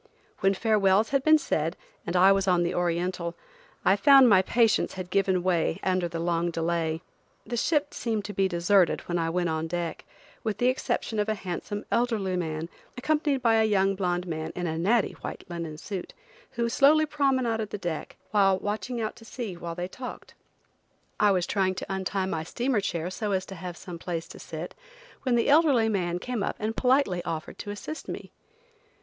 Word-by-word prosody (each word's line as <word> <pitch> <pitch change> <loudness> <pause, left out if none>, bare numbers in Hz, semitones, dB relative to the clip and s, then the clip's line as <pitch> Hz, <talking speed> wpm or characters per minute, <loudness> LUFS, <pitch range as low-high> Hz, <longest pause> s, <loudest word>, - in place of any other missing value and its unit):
When 195 0 +3
farewells 210 0 +3
had 275 0 +2
been 310 +1 +7
said, 165 - -1 0.3
and 170 - -2
I 185 +2 +7
was 195 0 +2
on 180 -2 +3
the 170 +1 -1
Oriental, 175 0 -1 0.5
I - - +6
found 275 -3 +7
my 195 -5 +6
patience 225 +3 +2
had 185 -1 -6
given 190 -2 +2
way 175 -1 +1
under 185 -2 +1
the 170 0 -5
long 170 0 0
delay. 165 -1 -1 0.4
The 240 - -4
ship 295 +4 +1
seemed 220 -3 -2
to 210 - -5
be 195 -1 +2
deserted 180 0 +3
when 175 0 -2
I 165 0 0
went 175 0 0
on 160 0 -1
deck, 170 0 -3 0.4
with 215 -3 -2
the 245 - +3
exception 235 -3 -1
of 210 +1 0
a 215 - +1
handsome, 200 +2 -5
elderly 220 -6 +1
man, 160 -2 -3 0.3
accompanied 290 0 0
by 225 -2 +4
a - - +4
young 195 -2 +3
blonde 180 -2 -1
man 160 -2 -4
in 180 - -3
a 160 -1 -2
natty 205 +7 +2
white - - -6
linen 165 -3 -5
suit, 195 - -6 0.4
who 235 -1 0
slowly 290 +6 +5
promenaded 260 -7 0
the 210 - -4
deck, 175 -5 -5 0.2
watching 205 +4 +1
out 215 -1 -3
to 225 - -14
sea 225 -3 -5
while 170 -1 -6
they 175 +1 -3
talked. 250 +6 -9 0.9
I 210 - +5
was 185 -3 +2
trying 190 -2 0
to 195 - -5
untie 190 0 -1
my 165 -4 -2
steamer 240 +6 0
chair 175 -2 -2
so 210 +1 -2
as 190 0 0
to 195 - -9
have 180 -1 -7
some 175 -2 -8
place 165 -1 -4
to - - -11
sit, - - -7 0.5
when 255 -3 +1
the 235 - +2
elderly 280 -7 +5
man 175 -4 0
came 245 +4 -3
up - - -1
and 220 +1 -3
politely 250 -9 +2
offered 160 0 -5
to - - -6
assist 205 +10 -6
me. - - -7
195 Hz, 190 wpm, -27 LUFS, 175-225 Hz, 0.9 s, been